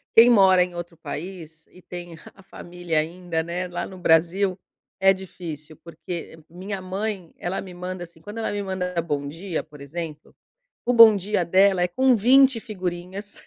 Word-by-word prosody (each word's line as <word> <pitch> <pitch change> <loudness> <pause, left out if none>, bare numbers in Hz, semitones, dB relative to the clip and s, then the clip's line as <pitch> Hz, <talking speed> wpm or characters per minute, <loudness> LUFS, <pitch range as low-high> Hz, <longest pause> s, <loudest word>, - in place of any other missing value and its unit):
Quem 230 +2 +9
mora 190 -5 +6
em 180 -1 -1
outro 175 -1 -7
país 165 0 -8
e 185 - -17
tem 175 -2 -9 0.2
a 195 - -18
família 175 -4 -3
ainda, 170 +1 -3
né, 175 +2 -4
lá 175 - -3
no 190 - -10
Brasil 180 +3 +2 0.4
é 195 0 +6
difícil 165 -5 -9
porque 170 0 -8
minha 190 +3 -6
mãe, 190 -1 -4
ela 180 +2 -3
me 185 -2 -10
manda 180 0 -6
assim 165 -1 -14
Quando 210 +6 -8
ela 220 - -1
me 205 0 -2
manda 180 -2 -2
bom 145 -3 -3
dia, 165 +3 -4
por 150 -2 -16
exemplo, 155 +1 -7 0.5
o 245 - +2
bom 225 -2 +9
dia 200 -2 -1
dela 190 +1 +4
é - - +2
com 255 +7 +3
20 260 +2 +5
figurinhas. 185 0 -6
180 Hz, 175 wpm, -24 LUFS, 170-195 Hz, 0.5 s, Quem